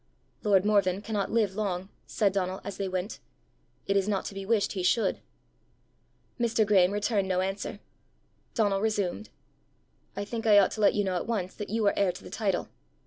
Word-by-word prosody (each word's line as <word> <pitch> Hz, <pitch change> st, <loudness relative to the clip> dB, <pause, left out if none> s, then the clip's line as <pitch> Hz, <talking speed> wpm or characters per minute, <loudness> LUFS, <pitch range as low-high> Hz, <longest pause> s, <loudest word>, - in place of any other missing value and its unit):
"Lord 200 Hz, -3 st, +3 dB
Morven 200 Hz, -2 st, +2 dB
cannot 210 Hz, -2 st, -2 dB
live 220 Hz, -4 st, +1 dB
long," 190 Hz, -3 st, -2 dB, 0.2 s
said 200 Hz, -3 st, +1 dB
Donal 185 Hz, -1 st, -1 dB
as 200 Hz, -2 st, -6 dB
they 195 Hz, -, -2 dB
went. 185 Hz, +3 st, -3 dB, 0.7 s
"It 195 Hz, -, 0 dB
is 195 Hz, 0 st, +2 dB
not 200 Hz, -2 st, 0 dB
to -, -, -5 dB
be 195 Hz, 0 st, -6 dB
wished 215 Hz, -2 st, +2 dB
he 190 Hz, -, -3 dB
should." 220 Hz, +5 st, +2 dB, 1.2 s
Mr. 230 Hz, -2 st, +2 dB
Graeme 190 Hz, -3 st, +4 dB
returned 205 Hz, -1 st, 0 dB
no 185 Hz, -1 st, +1 dB
answer. 195 Hz, +2 st, -3 dB, 0.8 s
Donal 205 Hz, -4 st, +2 dB
resumed. 210 Hz, -2 st, -1 dB, 0.9 s
"I 200 Hz, -, -3 dB
think 225 Hz, +2 st, -4 dB
I 210 Hz, -1 st, +7 dB
ought 200 Hz, -, +5 dB
to 215 Hz, -, -4 dB
let 205 Hz, -, +5 dB
you 205 Hz, -, +2 dB
know 185 Hz, -2 st, -1 dB
at -, -, -4 dB
once 195 Hz, -6 st, -2 dB
that 210 Hz, -, -7 dB
you 220 Hz, +1 st, 0 dB
are 200 Hz, -, +4 dB
heir 195 Hz, -2 st, +2 dB
to -, -, -11 dB
the -, -, -11 dB
title." 195 Hz, -5 st, -1 dB
200 Hz, 195 wpm, -28 LUFS, 190-215 Hz, 1.2 s, I